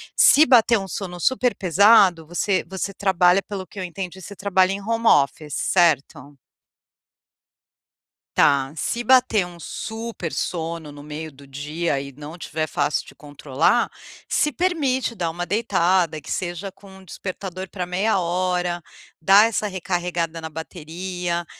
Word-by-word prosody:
se 305 - +7
bater 235 -4 +5
um 195 -2 -5
sono 180 -1 -6
super 250 +6 +1
pesado 185 -2 +4
você 185 +3 0
você 190 +1 -4
trabalha 190 -1 +3
pelo 195 -2 -6
que 195 - -11
eu - - -3
entendi 185 +1 -6
você 200 +2 -9
trabalha 190 -1 +2
em 200 +1 -4
home 230 +2 -1
office, 145 -1 +2
certo? 145 -4 +1 2.0
Tá, 140 0 +3
se 235 +9 -2
bater 245 -5 +4
um 175 -1 -11
super 220 +1 -6
sono 165 -2 -4
no 145 0 -11
meio 150 +2 -7
do 140 0 -16
dia 145 +2 -2
e 140 0 -8
não 150 +4 -10
tiver 155 -2 -3
fácil 145 -1 -1
de - - -14
controlar, 145 -2 0 0.4
se 300 - +1
permite 275 -8 0
dar 175 -5 -2
uma 175 +2 -4
deitada, 185 -5 +1
que - - -13
seja 180 +2 -3
com 190 0 -16
um 190 - -16
despertador 185 +1 -6
pra 185 -3 -4
30min, 180 -2 0 0.4
dá 195 +6 +7
essa 220 -2 -1
recarregada 175 -3 -3
na 160 - -6
bateria, 175 +2 -5
180 Hz, 145 wpm, -22 LUFS, 160-200 Hz, 2.0 s, se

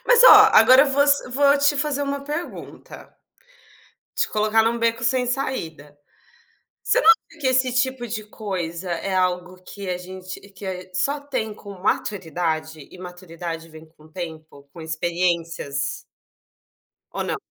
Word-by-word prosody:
Mas, - - +6
ó, - - +11 0.2
agora 255 +4 +7
eu 280 - 0
vou 285 +1 +3 0.3
vou 280 +2 +4
te 285 +1 +3
fazer 285 0 -1
uma 280 0 -3
pergunta 300 +4 -8 1.0
te - - +1
colocar 215 +1 +2
num 230 +1 0
beco 230 0 0
sem 255 +1 +1
saída. 165 - -4 0.9
Você - - +2
não - - +1
acha 385 -7 +2
que 275 - -1
esse 255 -1 +2
tipo 250 -1 -1
de 215 -1 -5
coisa 185 -5 -5
é 180 +3 -3
algo 180 0 -1
que 195 0 -8
a 180 - -1
gente 185 +1 -9
que 185 -1 -7
só 280 +10 0
tem 255 -7 -4
com 205 -1 -11
maturidade 160 -6 -2
e - - -13
maturidade 170 -2 -8
vem 160 0 -13
com 155 - -18
tempo, 155 -4 -9
com 165 - -10
experiências? 170 -3 -2 1.1
Ou - - -3
não? - - -3
190 Hz, 145 wpm, -22 LUFS, 170-260 Hz, 1.1 s, ó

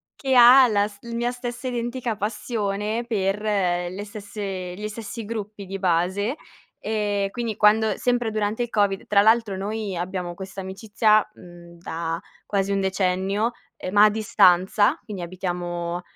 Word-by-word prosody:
che 270 -2 -1
ha 250 +2 +9
la 205 -2 +2
st 205 -1 -15
la 235 0 -7
mia 240 +1 0
stessa 245 +1 -6
identica 240 -1 -2
passione 210 +1 -2
per 205 -3 -1
le 185 -2 -1
stesse 200 -3 -6
gli 210 +2 -5
stessi 215 +1 -7
gruppi 210 -2 -6
di 195 +1 -5
base. 190 - 0 0.4
E 205 -2 -1
quindi 235 -3 -3
quando, 215 0 +4
sempre 245 -2 0
durante 215 +2 -1
il 240 - -5
Covid 200 -3 0
tra 200 -1 +5
l'altro, 220 -2 +3
noi 205 -1 -3
abbiamo 180 -1 -4
questa 190 +1 -7
amicizia, 210 +2 +2
mhmm, 170 -1 -14
da 165 0 -4 0.3
quasi 200 -1 -1
un 195 - +1
decennio, 190 +3 0 0.3
ehm, 185 - -5
ma 205 +1 +7
a - - +6
distanza, 205 -2 +3
quindi 200 -4 -7
abitiamo 175 -1 -4
205 Hz, 150 wpm, -24 LUFS, 190-220 Hz, 0.4 s, ha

